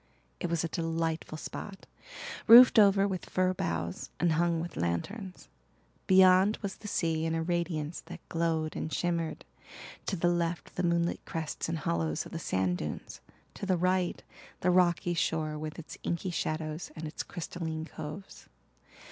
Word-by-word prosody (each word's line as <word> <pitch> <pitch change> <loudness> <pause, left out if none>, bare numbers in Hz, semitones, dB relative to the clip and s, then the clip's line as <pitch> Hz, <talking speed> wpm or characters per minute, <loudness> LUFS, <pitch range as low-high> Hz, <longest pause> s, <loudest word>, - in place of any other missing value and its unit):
It 175 - -2
was 170 -1 0
a - - 0
delightful 165 -1 -2
spot, 195 +5 -7 0.6
roofed 240 +1 +10
over 200 -1 +6
with 190 -2 -4
fir 185 0 +2
boughs 85 - -3
and 175 -1 +3
hung 170 +1 +2
with 165 -2 -5
lanterns. 185 - -3 0.6
Beyond 190 +2 +6
was 195 -1 -4
the 210 - -9
sea 165 -5 0
in 165 0 0
a 165 - 0
radiance 170 -2 -2
that - - -10
glowed 165 -2 -1
and 155 - -3
shimmered, 170 0 -1 0.6
to 195 - 0
the 175 0 +1
left 175 -1 -1
the - - -1
moonlit 170 -1 +1
crests 160 -1 -4
and 165 - -1
hollows 80 - -1
of - - -11
the - - -4
sand 95 -1 0
dunes, 75 -1 -6 0.3
to 200 - -6
the 185 -2 +2
right 180 0 +1 0.4
the 180 - +3
rocky 175 -1 +3
shore 160 -3 0
with 155 0 -5
its 165 - -9
inky 170 +2 -2
shadows 155 -1 -3
and 160 - -6
its 150 - -5
crystalline 160 -2 -5
coves. 165 +5 -9
170 Hz, 160 wpm, -30 LUFS, 155-185 Hz, 0.6 s, roofed